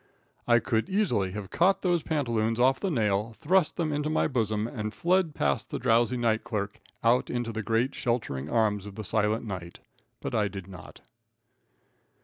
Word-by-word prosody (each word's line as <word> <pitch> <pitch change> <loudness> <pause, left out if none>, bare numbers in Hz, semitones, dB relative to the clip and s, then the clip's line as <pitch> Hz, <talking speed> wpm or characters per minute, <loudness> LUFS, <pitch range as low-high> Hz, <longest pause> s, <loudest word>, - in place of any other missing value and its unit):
I 120 -1 +6
could 115 - 0
easily 165 - +1
have 105 -2 -6
caught 185 +4 +3
those 175 -3 +2
pantaloons 115 -8 0
off 130 +2 +4
the 195 - -1
nail, 110 - 0
thrust 180 +1 +2
them 155 -3 -1
into 150 +1 -1
my 155 - +2
bosom, 110 -5 0
and 110 -2 -4
fled 175 -2 +1
past 70 - 0
the - - -3
drowsy 120 0 +2
night 115 -2 +1
clerk, 105 -4 -3 0.2
out 120 +2 +3
into 120 -1 -2
the 110 0 -3
great, 115 +5 0
sheltering 95 - -2
arms 105 -2 +1
of 100 - -9
the 110 - -5
silent 110 +2 0
night, 95 -5 -6 0.4
but - - -5
I 105 -2 +2
did 95 -2 -7
not. 90 -4 -12
115 Hz, 175 wpm, -28 LUFS, 105-135 Hz, 0.4 s, I